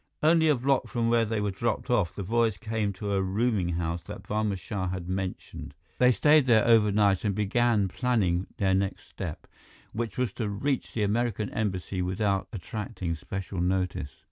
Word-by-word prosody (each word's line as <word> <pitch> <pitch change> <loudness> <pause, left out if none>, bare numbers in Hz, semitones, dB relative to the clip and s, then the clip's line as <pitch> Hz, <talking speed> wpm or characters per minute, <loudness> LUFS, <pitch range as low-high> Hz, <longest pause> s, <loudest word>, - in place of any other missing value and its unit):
Only 160 +1 +5
a 150 - +5
block 135 +2 +1
from 115 -2 0
where 115 -1 +4
they 110 0 -1
were 105 -1 0
dropped 115 +4 -2
off, 105 -9 +1
the 100 - -4
boys 115 0 +1
came 110 0 -2
to 100 +2 -3
a 95 - +2
rooming 100 -1 0
house 85 0 -2
that - - -8
Barma 105 -2 -1
Shah 95 0 -4
had 90 -1 -4
mentioned. 95 -6 -5 0.2
They 125 0 +6
stayed 150 +2 +4
there 110 -3 +5
overnight 105 -4 +4
and 100 -3 0
began 105 0 +2
planning 95 -5 0
their 95 -1 +2
next 95 +1 -1
step, - - -6 0.5
which 115 -2 -3
was 125 -2 0
to 110 -4 -3
reach 130 +7 -2
the 110 - 0
American 105 0 0
Embassy 95 -3 -2
without 95 +2 0
attracting 95 -3 -4
special 95 +3 -5
notice. 90 -7 -1
105 Hz, 175 wpm, -28 LUFS, 95-115 Hz, 0.5 s, They